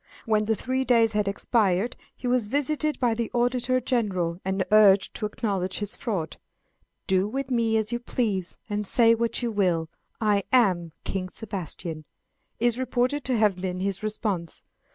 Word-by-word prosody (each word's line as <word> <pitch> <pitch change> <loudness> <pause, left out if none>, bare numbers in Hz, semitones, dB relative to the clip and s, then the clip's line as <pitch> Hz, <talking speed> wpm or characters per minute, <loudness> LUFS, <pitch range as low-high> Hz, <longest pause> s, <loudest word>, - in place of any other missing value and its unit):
When 215 -2 +2
the 220 +1 +1
three 260 +5 -1
days 230 -3 +4
had 210 -1 0
expired 200 +1 +1 0.2
he - - -10
was 245 -3 +1
visited 295 +4 0
by 245 -3 +2
the 230 0 -2
Auditor 245 +1 +1
General, 195 -9 -1
and 190 0 -1
urged 205 -2 +6
to 215 - -1
acknowledge 195 -4 -2
his 205 -1 -4
fraud. 200 - -3 0.7
"Do 190 0 +2
with 265 +4 -4
me 230 -2 +2
as 220 0 0
you 240 - -1
please, 210 -7 -2
and 210 -1 -2
say 230 +1 +5
what 230 +1 -1
you 235 - 0
will, 175 -6 +1 0.3
I 210 -2 +2
am 185 -10 +3
King 185 -1 -3
Sebastian," 175 -6 -5 0.5
is 240 +1 +1
reported 260 +2 0
to 255 -2 +1
have 210 -4 +3
been 180 -1 -3
his 195 0 -2
response. 210 -5 -3
215 Hz, 165 wpm, -26 LUFS, 190-240 Hz, 0.7 s, urged